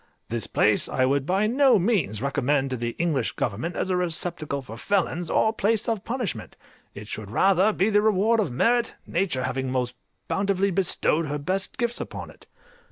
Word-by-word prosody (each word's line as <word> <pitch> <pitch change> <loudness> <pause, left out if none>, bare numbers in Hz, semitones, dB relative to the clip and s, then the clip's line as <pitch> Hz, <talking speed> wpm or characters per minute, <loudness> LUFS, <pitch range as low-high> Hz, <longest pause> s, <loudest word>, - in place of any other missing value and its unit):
This 115 0 -3
place 105 -1 +2
I 130 - +1
would 135 +1 0
by 195 +3 +2
no 260 +3 +4
means 170 - 0
recommend 140 0 0
to - - 0
the 120 -1 -4
English 155 -8 0
government 120 - -3
as 190 - -1
a - - +2
receptacle 165 -5 -2
for 115 - -9
felons, 175 - -1
or 220 - +2
place 220 +1 0
of 225 -4 -1
punishment; 225 - -4 0.4
it 105 +1 -9
should 105 -2 -6
rather 190 - +3
be 205 +1 +1
the 205 0 +4
reward 220 +2 +3
of 195 -11 0
merit, 235 - +1
nature 165 -8 -1
having 130 0 -2
most 125 -1 -1 0.3
bountifully 195 0 +1
bestowed 170 -3 +1
her 145 +1 -2
best 185 +7 -2
gifts 240 -1 -1
upon - - -7
it. - - -20
175 Hz, 180 wpm, -25 LUFS, 130-205 Hz, 0.4 s, no